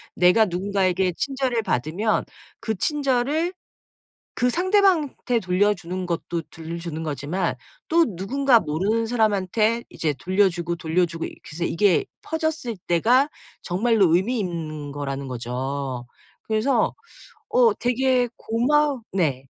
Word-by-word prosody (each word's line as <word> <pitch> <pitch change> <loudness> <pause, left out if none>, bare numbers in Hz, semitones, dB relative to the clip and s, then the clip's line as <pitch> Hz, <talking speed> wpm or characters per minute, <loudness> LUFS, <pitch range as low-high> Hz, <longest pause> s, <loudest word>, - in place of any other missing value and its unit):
내가 180 +5 +5
누군가에게 185 -1 0
친절을 265 -4 -1
받으면 185 - 0 0.3
그 220 - -2
친절을 290 - 0 0.9
그 250 0 +3
상대방한테 355 - +2
돌려주는 185 -1 0
것도 170 -1 -3
돌려주는 165 0 -6
거지만 150 +4 -2 0.3
또 335 +1 +5
누군가 250 +5 +3
모르는 195 +9 0
사람한테 220 0 +1
이제 155 -2 -1
돌려주고 185 -3 +1
돌려주고 165 0 0
이렇게 - - -8
해서 170 +2 -2
이게 185 +2 +3 0.2
퍼졌을 315 - -2
때가 245 - +3 0.3
정말로 195 -2 +2
의미 225 +7 +1
있는 155 -6 -4
거라는 140 -1 -4
거죠. 125 +1 -4 0.4
그래서 220 +5 +1 0.5
어 475 -1 +4
되게 250 - +1
고마 275 +4 +1
네. 140 -8 0
195 Hz, 275 characters per minute, -23 LUFS, 170-245 Hz, 0.9 s, 내가